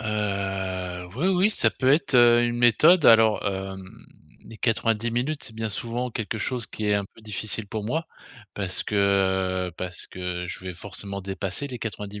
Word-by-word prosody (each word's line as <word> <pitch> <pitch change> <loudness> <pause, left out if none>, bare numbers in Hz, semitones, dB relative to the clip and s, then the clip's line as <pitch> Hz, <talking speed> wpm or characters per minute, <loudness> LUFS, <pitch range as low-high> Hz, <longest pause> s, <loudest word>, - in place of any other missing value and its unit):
Heu, 95 -4 -3
oui, 160 - 0
oui, 190 +2 +3
ça - - +5
peut 130 +1 +2
être, 150 -2 +1
heu, 120 -1 +6
une 120 0 -1
méthode. 150 - +5
Alors, 110 -2 +6
hem, 95 -1 -6 0.4
les 115 - -12
90 115 0 0
minutes, 130 +6 -2
c'est 110 - -5
bien 110 -1 -3
souvent 120 +4 -3
quelque 110 0 -4
chose 125 +2 -2
qui 105 - -5
est 105 - +3
un 100 -1 0
peu 105 - -18
difficile 110 -1 -4
pour 105 0 -5
moi. 160 +9 -2 0.5
Parce 95 -2 -2
que, - - -5 0.7
heu, - - -10
parce 90 -1 -6
que, 90 -1 -5
je 90 - -5
vais 90 -1 -5
forcément 100 +2 -6
dépasser 95 +6 -3
les 125 -2 -7
90 105 -2 -6
110 Hz, 180 wpm, -25 LUFS, 95-120 Hz, 0.7 s, heu